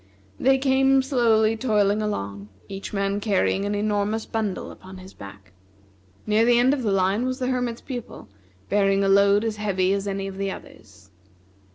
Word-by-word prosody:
They 270 +1 +4
came 270 0 +3
slowly 225 -5 +2
toiling 210 -3 +1
along, 100 - -4 0.2
each 195 0 -7
man 200 0 -1
carrying 200 -1 0
an 205 0 -1
enormous 210 +1 -1
bundle 215 -4 -3
upon 190 0 -12
his 185 +1 -12
back. 95 -1 -13 0.7
Near 215 +1 +2
the 240 0 +4
end 250 +3 +4
of 285 - -2
the 215 -4 0
line 195 +4 +1
was 255 0 -2
the 255 - -3
Hermit's 245 -2 -2
Pupil, 245 - -8 0.4
bearing 195 -1 +2
a - - +1
load 200 +1 +4
as 220 -2 -2
heavy 190 -3 0
as 200 0 -2
any 195 0 -3
of 195 -1 -7
the 195 0 -1
others. 95 - -12
205 Hz, 175 wpm, -24 LUFS, 195-230 Hz, 0.7 s, They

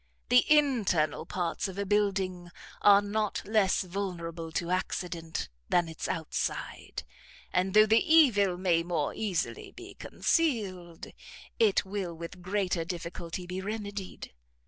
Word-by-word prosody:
The 250 0 +6
internal 230 - +2
parts 175 +1 -2
of 190 0 -8
a 200 - -1
building 190 -3 0 0.3
are 205 0 +7
not 210 0 -2
less 205 -3 +2
vulnerable 170 -3 -5
to 170 +2 -2
accident 175 -3 -3 0.2
than 175 -1 +3
its 160 -1 -5
outside; 160 -2 -3 0.5
and 185 +2 +1
though 215 0 +8
the 220 +1 +4
evil 245 - +5
may 175 -2 +2
more 170 -4 -1
easily 180 - -2
be 365 0 -11
concealed, 195 - -1 0.5
it 210 -4 +3
will 190 -3 -4
with 170 +2 -8
greater 185 -2 -1
difficulty 170 0 -6
be 180 +1 -5
remedied. 205 -1 -6
190 Hz, 125 wpm, -29 LUFS, 175-205 Hz, 0.5 s, though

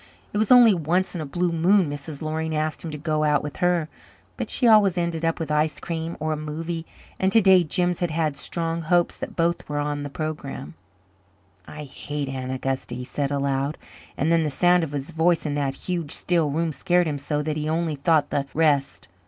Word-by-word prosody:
It 205 - 0
was 215 +1 +1
only 240 -4 +8
once 175 +2 0
in 175 - -4
a 150 - -5
blue 175 +5 0
moon 175 +3 +3
Mrs. 145 +1 -6
Loring 160 0 -2
asked 155 0 -2
him 165 - -4
to 150 - -5
go 155 0 -1
out 150 -1 +2
with 145 - -6
her. 175 -3 +1 0.5
But - - -4
she 245 - +2
always 205 -5 +5
ended 170 -2 -1
up 165 +1 0
with 160 -2 -3
ice 150 +1 +1
cream 165 0 -4
or 155 +1 -1
a - - -1
movie, 160 +2 -5 0.3
and 190 0 +2
to 225 - +6
day 190 -3 +6
Jims 175 +2 0
had 175 - 0
had 155 -2 -1
strong 165 +3 -3
hopes 175 +2 +1
that - - -6
both 170 -1 0
were 145 - -2
on 145 0 -2
the 145 - -5
programme. 140 - -5 0.9
"I 150 0 -8
hate 145 0 -5
Aunt 130 -1 -4
Augusta," 130 -1 -3
he 125 0 -6
said 140 +2 -2
aloud; 140 +1 -1 0.4
and 155 +4 +1
then 165 -1 +4
the 155 - 0
sound 175 +5 +3
of 155 - -4
his 145 +3 -4
voice 165 0 +2
in 150 - -1
that 140 -2 -1
huge, 170 -5 -2
still 170 -4 +1
room 160 +3 -1
scared 175 +3 +1
him 145 -2 -2
so 150 +1 -2
that 155 0 -2
he 155 0 -2
only 160 -1 0
thought 145 +1 +2
the 140 -1 -1
rest. 145 -3 +1
155 Hz, 220 wpm, -24 LUFS, 145-170 Hz, 0.9 s, only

